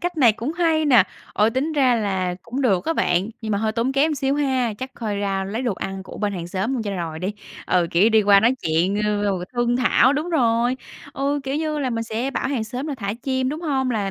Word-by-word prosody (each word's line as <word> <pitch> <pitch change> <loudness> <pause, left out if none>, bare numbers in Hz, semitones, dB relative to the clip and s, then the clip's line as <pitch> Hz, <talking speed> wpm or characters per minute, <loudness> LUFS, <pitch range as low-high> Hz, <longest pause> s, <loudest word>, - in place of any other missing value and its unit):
cách 355 -1 -3
này 240 -7 +5
cũng 240 +8 -4
hay 325 -2 +1
nè, 245 -9 +6 0.3
ừ, 210 +1 +4
tính 270 +7 -1
ra 265 -4 +3
là 190 -5 -1
cũng 255 +4 -4
được 195 -7 +2
á 325 - +1
bạn, 180 - +1
nhưng 215 -2 -3
mà 200 - +1
hơi 215 0 0
tốn 240 +3 0
kém 300 +3 +2
xíu 275 0 0
ha, 260 -6 0
chắc 260 0 -6
coi 215 -3 -3
ra 195 -1 -1
lấy 220 +6 -3
đồ 235 -6 0
ăn 195 +1 -5
của - - -10
bên 205 -1 -1
hàng 175 -3 -5
xóm 195 +8 -2
luôn 245 - -1
cho 205 - -3
rồi 165 -2 -4
đi. 185 +4 -2 0.3
Ừ, 180 -2 +2
kiểu, 190 +6 +4
đi 220 -1 +5
qua 200 -1 +6
nói 235 +4 +3
chuyện 165 +5 +1
r - - 0
r 210 -1 0
rồi 190 -3 -1
thương 240 0 +1
thảo, 255 +1 +4
đúng 310 +5 -2
rồi, 240 -3 +2 0.4
ừ, 280 +1 -1
kiểu 270 - -2
như 310 -1 -1
là, 260 -3 -1
mình 230 0 -2
sẽ 230 +4 -2
bảo 265 - -2
hàng 255 -6 -1
xóm 250 +6 -5
là 295 - -3
thả 200 -4 -3
chim, 260 -1 0
đúng 305 +4 -4
hông? 265 -6 0
Là 205 -4 -1
235 Hz, 265 wpm, -22 LUFS, 200-270 Hz, 0.4 s, nè